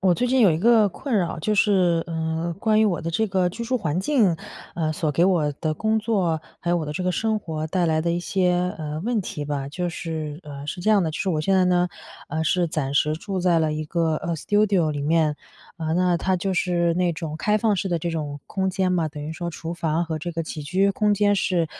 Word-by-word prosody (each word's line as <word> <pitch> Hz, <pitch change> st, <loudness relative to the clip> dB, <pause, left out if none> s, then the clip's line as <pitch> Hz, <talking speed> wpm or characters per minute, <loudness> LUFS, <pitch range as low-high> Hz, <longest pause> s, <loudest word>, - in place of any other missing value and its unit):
我 185 Hz, -2 st, +4 dB
最 245 Hz, +7 st, 0 dB
近 260 Hz, +1 st, +2 dB
有 205 Hz, -6 st, +6 dB
一 155 Hz, -, +1 dB
个 220 Hz, +1 st, +5 dB
困 230 Hz, +5 st, -3 dB
扰。 175 Hz, -2 st, -1 dB
就 210 Hz, +7 st, 0 dB
是， 185 Hz, -5 st, +3 dB
呃， 160 Hz, +1 st, -2 dB
关 215 Hz, +1 st, +3 dB
于 220 Hz, -, +5 dB
我 185 Hz, -5 st, +1 dB
的 165 Hz, -, -4 dB
这 220 Hz, +7 st, +1 dB
个 185 Hz, -2 st, +2 dB
居 235 Hz, +6 st, -6 dB
住 255 Hz, +2 st, 0 dB
环 165 Hz, -4 st, -1 dB
境， 210 Hz, -, +2 dB, 0.4 s
呃， 160 Hz, -2 st, -1 dB
所 155 Hz, -1 st, -1 dB
给 165 Hz, +4 st, +3 dB
我 170 Hz, -6 st, +2 dB
的 155 Hz, -, 0 dB
工 220 Hz, +6 st, 0 dB
作， 195 Hz, -8 st, 0 dB, 0.2 s
还 175 Hz, -, -2 dB
有 -, -, +3 dB
我 165 Hz, -, -2 dB
的 150 Hz, -, -4 dB
这 180 Hz, +4 st, -3 dB
个 180 Hz, -, +1 dB
生 220 Hz, +3 st, 0 dB
活 160 Hz, -5 st, -4 dB
带 180 Hz, 0 st, +1 dB
来 155 Hz, -1 st, +2 dB
的 170 Hz, +2 st, 0 dB
一 170 Hz, -, 0 dB
些， 180 Hz, 0 st, 0 dB
呃， 155 Hz, -1 st, -4 dB
问 235 Hz, -1 st, +1 dB
题 150 Hz, -5 st, -5 dB
吧。 140 Hz, -2 st, -3 dB
就 175 Hz, +4 st, -3 dB
是 160 Hz, -2 st, -5 dB
呃， 145 Hz, -2 st, -8 dB
是 175 Hz, +4 st, -5 dB
这 215 Hz, -, +2 dB
样 210 Hz, -2 st, +5 dB
的， -, -, 0 dB
就 -, -, -5 dB
是 -, -, -1 dB
我 160 Hz, -4 st, +1 dB
现 190 Hz, +5 st, +1 dB
在 185 Hz, -1 st, +4 dB
呢， 180 Hz, 0 st, +2 dB, 0.4 s
呃， 160 Hz, +2 st, -2 dB
是 175 Hz, +3 st, +2 dB
暂 155 Hz, -4 st, -2 dB
时 150 Hz, +1 st, +3 dB
住 190 Hz, +4 st, -4 dB
在 175 Hz, -2 st, +3 dB
了 155 Hz, -1 st, +1 dB
一 155 Hz, 0 st, -3 dB
个， 160 Hz, 0 st, 0 dB
呃， 170 Hz, +2 st, -3 dB
studio 200 Hz, -1 st, +2 dB
里 145 Hz, -1 st, -3 dB
面。 155 Hz, 0 st, +2 dB, 0.4 s
呃， 160 Hz, -1 st, -1 dB
那 180 Hz, 0 st, +2 dB
它 185 Hz, +2 st, 0 dB
就 190 Hz, +1 st, -2 dB
是 175 Hz, -2 st, +1 dB
那 180 Hz, 0 st, +1 dB
种 155 Hz, -1 st, -5 dB
开 210 Hz, +6 st, +1 dB
放 215 Hz, -1 st, +2 dB
式 190 Hz, 0 st, -2 dB
的 170 Hz, -, 0 dB
这 170 Hz, -, -3 dB
种 150 Hz, -3 st, -4 dB
空 190 Hz, -1 st, -1 dB
间 185 Hz, 0 st, 0 dB
嘛， 170 Hz, -3 st, +1 dB
等 150 Hz, -1 st, -8 dB
于 155 Hz, -, -4 dB
说 170 Hz, +1 st, -4 dB
厨 165 Hz, +1 st, -6 dB
房 170 Hz, 0 st, 0 dB
和 160 Hz, -1 st, -3 dB
这 175 Hz, +3 st, -4 dB
个 165 Hz, -, -3 dB
起 155 Hz, -1 st, -6 dB
居 190 Hz, +6 st, +2 dB
空 210 Hz, +1 st, +2 dB
间 205 Hz, 0 st, +3 dB
是， 180 Hz, -4 st, +1 dB
175 Hz, 290 characters per minute, -24 LUFS, 160-190 Hz, 0.4 s, 有